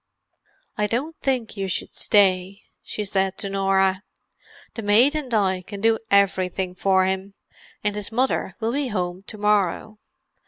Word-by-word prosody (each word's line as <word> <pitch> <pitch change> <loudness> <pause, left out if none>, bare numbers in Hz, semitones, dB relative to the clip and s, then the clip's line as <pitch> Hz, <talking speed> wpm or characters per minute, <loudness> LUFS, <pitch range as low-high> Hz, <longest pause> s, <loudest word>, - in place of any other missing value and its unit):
"I 210 - +2
don't 270 +9 -2
think 255 -6 -1
you 195 -2 -3
should 180 - -4
stay," 195 -1 +2 0.2
she 210 - -5
said 190 -1 0
to 200 - -3
Norah. 195 -1 +2 0.7
"The 225 - -6
maid 220 +7 +4
and 300 -5 -4
I 190 -4 +1
can 200 +2 -9
do 225 +1 +2
everything 190 -2 +2
for 190 0 +2
him—and 195 +2 -5
his 210 +1 -4
mother 245 -6 0
will 230 0 -1
be 285 0 -1
home 180 -4 -3
to 215 - -7
morrow. 210 0 0
200 Hz, 150 wpm, -23 LUFS, 190-220 Hz, 0.7 s, maid